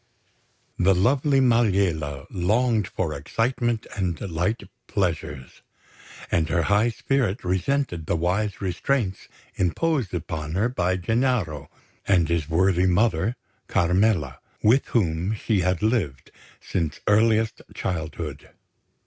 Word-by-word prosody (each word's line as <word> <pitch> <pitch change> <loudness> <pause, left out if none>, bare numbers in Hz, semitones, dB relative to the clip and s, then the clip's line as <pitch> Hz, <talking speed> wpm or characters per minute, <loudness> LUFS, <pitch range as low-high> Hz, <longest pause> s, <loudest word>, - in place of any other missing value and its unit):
The 95 +2 +4
lovely 135 +8 +3
Maliella 95 - +2
longed 110 +4 +1
for 80 -5 -2
excitement 115 - -1
and 90 -6 -2
light 95 +4 -2 0.2
pleasures; 80 -8 -3 0.7
and 80 -1 +1
her 85 0 +1
high 105 +6 +3
spirit 120 -3 -1
resented 90 - -1
the - - +1
wise 95 +6 -1
restraints 95 +2 -1 0.3
imposed 125 - 0
upon 75 0 -4
her 105 +6 +2
by 95 -6 0
Gennaro 100 - 0 0.4
and 90 -5 +3
his 85 -2 -1
worthy 90 +2 +3
mother, 95 +2 +2 0.3
Carmela, 90 - +1 0.2
with 120 +6 +4
whom 90 -1 0
she 105 -1 0
had 90 0 0
lived 95 - -1 0.3
since 80 -4 -3
earliest 110 +1 +3
childhood. 80 -5 -4
95 Hz, 110 wpm, -24 LUFS, 85-115 Hz, 0.7 s, The